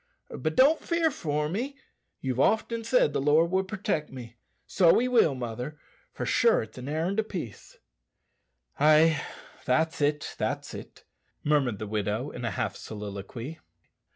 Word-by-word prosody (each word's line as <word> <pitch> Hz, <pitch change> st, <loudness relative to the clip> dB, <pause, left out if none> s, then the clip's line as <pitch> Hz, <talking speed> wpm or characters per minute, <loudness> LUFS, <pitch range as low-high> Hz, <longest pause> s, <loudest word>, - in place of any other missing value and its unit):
But 155 Hz, +4 st, -2 dB
don't 290 Hz, +5 st, +5 dB
fear 335 Hz, -2 st, +1 dB
for 150 Hz, -, -2 dB
me. 250 Hz, -, -3 dB, 0.4 s
You've 130 Hz, -1 st, -2 dB
often 225 Hz, -, +1 dB
said 230 Hz, -, +3 dB
the -, -, 0 dB
Lord 155 Hz, +4 st, +3 dB
would 190 Hz, 0 st, +1 dB
protect 185 Hz, -7 st, -2 dB
me. 120 Hz, -3 st, -9 dB, 0.3 s
So 175 Hz, -4 st, +4 dB
he 250 Hz, -, +2 dB
will, 225 Hz, -, +4 dB
mother, 125 Hz, +4 st, -5 dB, 0.3 s
for -, -, -5 dB
sure 485 Hz, +1 st, +3 dB
it's -, -, -11 dB
an 125 Hz, +3 st, -6 dB
errand 165 Hz, +7 st, -1 dB
o' -, -, +3 dB
peace." 175 Hz, -, -8 dB, 1.0 s
"Ay 155 Hz, +1 st, +5 dB, 0.4 s
that's 160 Hz, +5 st, +1 dB
it, 145 Hz, 0 st, 0 dB
that's -, -, -2 dB
it," -, -, -10 dB, 0.4 s
murmured 140 Hz, -7 st, +2 dB
the 110 Hz, -, -5 dB
widow 105 Hz, +5 st, -2 dB
in 125 Hz, -, -7 dB
a 120 Hz, -, 0 dB
half 95 Hz, -, -2 dB
soliloquy. 105 Hz, +7 st, -7 dB
150 Hz, 155 wpm, -28 LUFS, 125-195 Hz, 1.0 s, don't